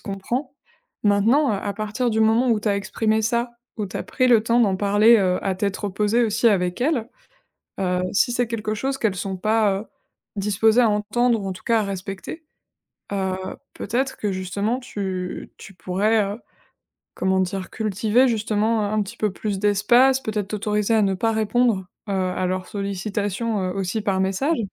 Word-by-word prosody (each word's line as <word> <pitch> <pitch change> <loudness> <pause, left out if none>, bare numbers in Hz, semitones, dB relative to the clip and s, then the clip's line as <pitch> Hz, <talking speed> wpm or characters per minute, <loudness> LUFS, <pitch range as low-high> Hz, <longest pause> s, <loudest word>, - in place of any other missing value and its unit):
comprend. 200 +7 -4 0.5
Maintenant, 220 +8 +3
heu, - - +1
à 200 - -2
partir 215 +4 -2
du 220 0 0
moment 225 +3 +3
où 220 -2 +2
tu 210 - -1
as 200 - +2
exprimé 215 +2 0
ça, 235 +2 0 0.3
où 210 -3 -2
tu - - -7
as - - -3
pris 255 -1 +1
le 230 -3 +5
temps 235 +1 +2
d'en 200 -5 +3
parler, 205 +4 +5
heu, 185 -3 +2
à 195 - 0
tête 200 0 -1
reposée 210 +4 +1
aussi 225 +2 +1
avec 180 -1 0
elles, 255 -5 0 0.7
heu, 180 -1 0
si 245 - +3
c'est 245 0 +1
quelque 220 -1 -3
chose 270 +5 -2
qu'elles 210 -6 0
sont 190 +1 -3
pas, 215 +1 +2
heu, - - -8 0.5
disposées 215 +4 +3
à 230 - +4
entendre 220 +3 +1
ou 195 - -3
en - - -2
tout 185 - -12
cas 230 -1 +3
à - - 0
respecter, 195 - -6 0.7
heu, 190 -1 -1 0.4
peut-être 255 +5 -2
que 205 -2 -2
justement 200 +6 -2
tu 190 -6 -5
tu 195 - -12
pourrais, 205 +5 +1
heu, 205 +4 -5 0.7
comment 190 0 +1
dire? 185 0 -3
Cultiver 220 +4 +2
justement 220 -1 +1
un 205 0 -2
un 215 - +2
petit 205 +4 -8
peu 210 -3 -1
plus 205 0 -3
d'espace, 240 +6 +4
peut-être 210 -4 -3
t'autoriser 210 +1 0
à 220 - +4
ne 195 -1 +2
pas 225 +4 0
répondre, 220 -2 +1 0.2
heu, 200 - -1
à 185 -1 -1
leurs 185 0 -2
sollicitations, 200 +2 -2
heu, 185 - -1
aussi 195 +2 -2
par 195 -3 0
message. 195 - 0
210 Hz, 185 wpm, -23 LUFS, 195-230 Hz, 0.7 s, le